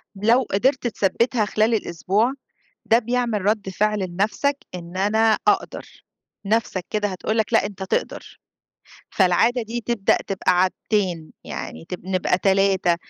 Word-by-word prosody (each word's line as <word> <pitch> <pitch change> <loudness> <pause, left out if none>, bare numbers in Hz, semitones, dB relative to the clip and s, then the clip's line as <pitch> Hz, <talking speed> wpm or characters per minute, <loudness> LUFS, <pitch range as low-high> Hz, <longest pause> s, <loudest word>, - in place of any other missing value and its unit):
لو 230 +6 +3
قدِرت 250 +5 +1
تثبِّتها 220 +2 0
خِلال 215 +2 +1
الأسبوع، 205 +5 0 0.5
ده 230 - +4
بيعمل 240 -2 -1
رَد 210 -2 0
فِعل 210 +2 0
لنفْسك 215 +10 0 0.2
إن 175 +1 -8
أنا 220 +3 +3
أقدَر، 410 -2 -1 0.4
نَفسك 200 -4 0
كده 210 -1 0
هتقول 205 +4 -3
لك، 220 +1 0
لأ 220 - +4
أنت 200 -1 -6
تقدَر، 190 - -3 0.7
فالعادة 220 +6 +2
دي 235 +2 -5
تبدأ 235 -4 +1
تبقى 190 -1 +1
عادتين 185 -3 -1
يعني 80 +1 -7
تب 180 - -7
نبقى 185 -1 +1
3 190 -2 +2
210 Hz, 135 wpm, -22 LUFS, 190-230 Hz, 0.7 s, ده